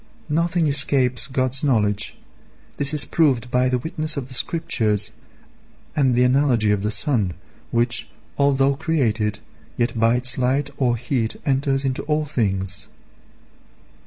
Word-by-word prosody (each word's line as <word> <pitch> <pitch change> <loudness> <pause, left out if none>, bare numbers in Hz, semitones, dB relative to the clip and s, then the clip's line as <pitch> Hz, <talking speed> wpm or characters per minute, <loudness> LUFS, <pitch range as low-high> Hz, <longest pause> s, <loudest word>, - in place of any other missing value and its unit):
Nothing 165 +2 0
escapes 140 -3 +2
God's 130 0 +2
knowledge. 105 -7 0 0.6
This 140 0 +1
is 150 -2 +3
proved 130 -7 0
by 125 0 +1
the 125 - 0
witness 155 +3 -1
of 135 -2 -5
the - - -10
Scriptures 110 - +2 0.8
and 135 -5 +2
the 125 - +3
analogy 125 -4 +2
of 105 -1 0
the 105 - -2
sun, 110 - +2 0.3
which, 120 0 0 0.3
although 140 -1 +2
created, 115 -9 -1 0.4
yet 120 -1 -1
by 115 +1 +3
its 125 +1 +2
light 135 +3 0
or 120 -3 0
heat 115 -1 -2
enters 135 0 0
into 130 -1 -2
all 150 0 -1
things. 100 -8 -2
130 Hz, 135 wpm, -21 LUFS, 115-140 Hz, 0.8 s, is